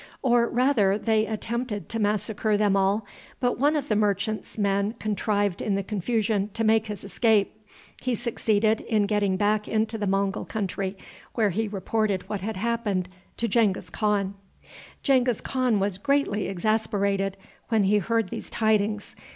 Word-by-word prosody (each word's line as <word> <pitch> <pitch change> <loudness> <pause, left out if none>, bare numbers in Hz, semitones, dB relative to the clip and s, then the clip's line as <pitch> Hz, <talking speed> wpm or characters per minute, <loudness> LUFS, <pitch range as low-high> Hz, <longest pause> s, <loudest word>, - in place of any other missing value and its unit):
Or, 240 -2 +3
rather, 235 -6 +3
they 220 0 +1
attempted 225 0 -3
to 225 - -3
massacre 210 0 0
them 205 -1 +3
all, 200 +2 +2 0.3
but 245 -2 0
one 290 +3 +3
of 290 -2 -1
the 215 - +1
merchants' 210 +1 -1
men 200 0 +1
contrived 205 -3 -1
in 205 - 0
the 200 - -1
confusion 210 0 0
to 225 - -1
make 220 0 +3
his 210 -3 -6
escape. 215 +1 +1 0.4
He 255 -2 0
succeeded 220 -1 +1
in 215 -3 +1
getting 200 -2 +1
back 210 +1 +1
into 220 0 0
the 205 - -1
Mongul 195 0 0
country, 195 -2 -3 0.4
where 215 -4 +2
he 220 +5 -1
reported 205 0 -1
what 205 -3 -3
had 220 +2 -3
happened 205 -3 -1 0.3
to 235 - 0
Genghis 220 -5 +1
Khan. 205 -3 0 0.7
Genghis 255 -4 +3
Khan 255 -5 0
was 195 -1 -1
greatly 275 -5 +1
exasperated 200 -1 0 0.3
when 220 -3 +3
he 205 +2 +3
heard 225 +1 0
these - - -6
tidings. 210 -1 0
210 Hz, 155 wpm, -26 LUFS, 200-225 Hz, 0.7 s, Or